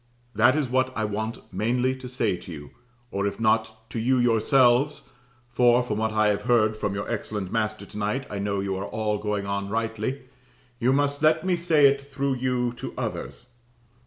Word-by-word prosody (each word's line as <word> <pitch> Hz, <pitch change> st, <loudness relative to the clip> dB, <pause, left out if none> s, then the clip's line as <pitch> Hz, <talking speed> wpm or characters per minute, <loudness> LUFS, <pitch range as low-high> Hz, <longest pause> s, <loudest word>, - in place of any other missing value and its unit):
That 120 Hz, +4 st, +4 dB
is 150 Hz, -3 st, 0 dB
what 130 Hz, +1 st, +1 dB
I 110 Hz, -, 0 dB
want 110 Hz, +1 st, -5 dB
mainly 125 Hz, +6 st, +1 dB
to 130 Hz, -1 st, -9 dB
say 120 Hz, -6 st, 0 dB
to 90 Hz, 0 st, -10 dB
you, 75 Hz, -3 st, -9 dB, 0.4 s
or 100 Hz, +1 st, -1 dB
if 100 Hz, -, -5 dB
not 110 Hz, 0 st, 0 dB
to 115 Hz, -, -3 dB
you 130 Hz, +3 st, +2 dB
yourselves 125 Hz, +4 st, +3 dB, 0.4 s
(for, 120 Hz, 0 st, +4 dB
from 110 Hz, -3 st, -3 dB
what 110 Hz, 0 st, 0 dB
I 110 Hz, -1 st, +3 dB
have 105 Hz, -, 0 dB
heard 110 Hz, -3 st, +3 dB
from 100 Hz, -2 st, -2 dB
your 100 Hz, -, -4 dB
excellent 100 Hz, -4 st, -4 dB
master 110 Hz, -2 st, -2 dB
to 105 Hz, -, -11 dB
night, 110 Hz, +6 st, -1 dB
I 100 Hz, -, -5 dB
know 100 Hz, 0 st, -1 dB
you 95 Hz, -1 st, -2 dB
are 105 Hz, +2 st, -2 dB
going 105 Hz, -1 st, -2 dB
on 100 Hz, 0 st, -2 dB
all -, -, -8 dB
rightly), 115 Hz, +4 st, -2 dB, 0.6 s
you 125 Hz, +3 st, +3 dB
must 145 Hz, +1 st, +1 dB
let 155 Hz, +2 st, +3 dB
me 185 Hz, -1 st, +2 dB
say 165 Hz, -4 st, +3 dB
it 140 Hz, 0 st, +4 dB
through 140 Hz, 0 st, -2 dB
you 125 Hz, -1 st, 0 dB
to -, -, -7 dB
others. 125 Hz, -, -5 dB
115 Hz, 195 wpm, -25 LUFS, 105-130 Hz, 0.6 s, That